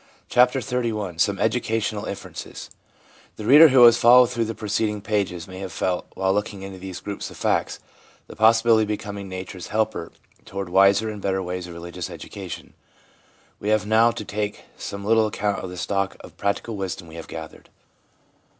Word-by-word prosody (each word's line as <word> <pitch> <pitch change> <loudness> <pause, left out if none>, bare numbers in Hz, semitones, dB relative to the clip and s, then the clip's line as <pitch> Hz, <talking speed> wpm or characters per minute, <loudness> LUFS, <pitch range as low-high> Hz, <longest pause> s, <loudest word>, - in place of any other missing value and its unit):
CHAPTER 125 +2 +4
XXXI 110 -8 -2
SOME 100 +2 +2
EDUCATIONAL 110 -1 -1
INFERENCES - - -8 0.6
The 105 - -7
reader 150 +7 +9
who 130 -3 +6
has 120 -1 +8
followed 125 +1 +7
through 115 -1 0
the 115 0 -4
preceding 105 0 -1
pages, 100 -4 -2
may 95 0 -9
have 95 -1 -6
felt, 90 -1 -2
while 95 0 +1
looking 100 -1 -3
into 95 -1 -8
these 95 -1 -7
groups 100 -1 -5
of - - -12
facts, - - 0 0.5
the - - -12
possibility 110 0 +5
of 110 - 0
becoming 100 -2 -5
nature's 95 0 -7
helper 110 -5 -1 0.3
toward 95 -2 -6
wiser 100 +4 +4
and 105 -2 -6
better 95 -1 -1
ways 90 0 -4
of 85 - -9
religious 85 0 -6
education. - - -8 0.9
We 105 - -3
have 110 -2 +2
now 110 +2 +5
to 110 -2 -5
take 105 0 -4
some 100 0 -6
little 110 0 +4
account 105 -1 -2
of 95 - -5
the 90 - -8
stock 100 +2 -1
of - - -13
practical 100 +3 -2
wisdom 95 -3 -5
we 80 - -13
have 80 - -8
gathered. 80 -1 -9
100 Hz, 175 wpm, -23 LUFS, 95-110 Hz, 0.9 s, reader